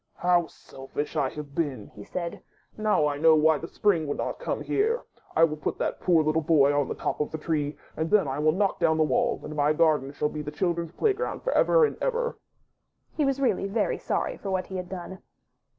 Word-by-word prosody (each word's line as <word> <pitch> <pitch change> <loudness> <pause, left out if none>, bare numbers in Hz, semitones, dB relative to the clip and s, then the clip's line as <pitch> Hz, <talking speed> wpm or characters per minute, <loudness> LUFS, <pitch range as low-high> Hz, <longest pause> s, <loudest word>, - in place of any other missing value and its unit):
*'How 175 -1 +2
selfish 135 +3 -7
I 140 -4 +1
have 150 -1 -8
been!*' 140 -9 -3
he 105 - -10
said; 170 - -5 0.3
''now 210 -8 +2
I 145 -1 -2
know 160 +1 +6
why 155 0 +4
the 165 - -6
Spring 170 -7 +1
would 145 - -2
not - - -3
come - - -3
here. 455 +4 0 0.3
I 165 - +5
will 155 -2 +2
put 150 - -3
that - - -2
poor 170 -3 +3
little 155 +1 +1
boy 145 -3 +4
on 145 -1 +1
the - - -4
top - - -3
of 150 - -1
the 160 - -5
tree, 150 -2 -2 0.2
and 160 +1 -2
then 210 -7 +4
I 135 +2 -3
will 155 +1 +4
knock 195 +4 0
down 160 -2 +3
the 160 - +4
wall, 145 -5 +1
and 155 - -7
my 150 +1 +3
garden 150 -4 +2
shall 150 +1 -1
be 150 - -5
the 150 - -5
children's 170 +1 -2
playground 435 - -1
for - - 0
ever - - +5
and - - -3
ever." 485 -1 -1 0.8
He 300 - +1
was 275 0 0
really 225 -7 +1
very 210 +2 -1
sorry - - -2
for 200 - -6
what 185 -1 -1
he 190 - -6
had 180 -1 -5
done. 190 0 -7
160 Hz, 230 wpm, -26 LUFS, 150-190 Hz, 0.8 s, know